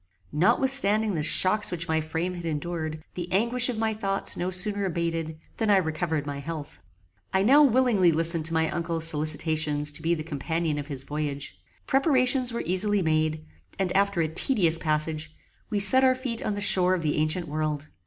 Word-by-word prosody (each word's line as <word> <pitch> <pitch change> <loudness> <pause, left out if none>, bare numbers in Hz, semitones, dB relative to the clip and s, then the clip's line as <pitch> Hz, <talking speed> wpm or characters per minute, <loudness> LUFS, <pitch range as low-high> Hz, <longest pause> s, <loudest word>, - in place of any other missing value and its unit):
Notwithstanding 220 - +2
the 160 - -2
shocks 195 +6 +3
which 175 -1 -4
my 160 0 0
frame 160 +3 -4
had 175 -1 -8
endured, 155 0 -5
the 175 0 -7
anguish 235 +5 +1
of 240 - -4
my 220 0 -1
thoughts 195 -2 -1
no 180 - -3
sooner 200 +2 0
abated 165 -2 -3 0.2
than 220 - -1
I 200 - +5
recovered 160 -3 -2
my 145 -1 -6
health. 150 0 -8 0.5
I 190 - +1
now 275 +8 +5
willingly 245 - +3
listened 165 0 -1
to 165 - +3
my 160 0 +1
uncle's 165 -1 0
solicitations 155 -1 0
to - - -5
be 170 +1 0
the 155 - -6
companion 160 0 -3
of 145 - -7
his 135 -3 -7
voyage. 145 -1 -5 0.3
Preparations 260 -2 +2
were 235 - -4
easily 195 +2 0
made, 155 -1 -1 0.3
and 190 -1 -2
after 200 -2 +1
a 160 - 0
tedious 170 - +2
passage, 155 0 -2 0.4
we 215 - -2
set 205 +7 +8
our 260 -1 +3
feet 255 -2 -5
on 210 -5 -3
the 205 - -5
shore 185 -2 +3
of 170 - -5
the 150 -1 -1
ancient 155 +3 -1
world. 155 0 -4
170 Hz, 185 wpm, -25 LUFS, 155-205 Hz, 0.5 s, set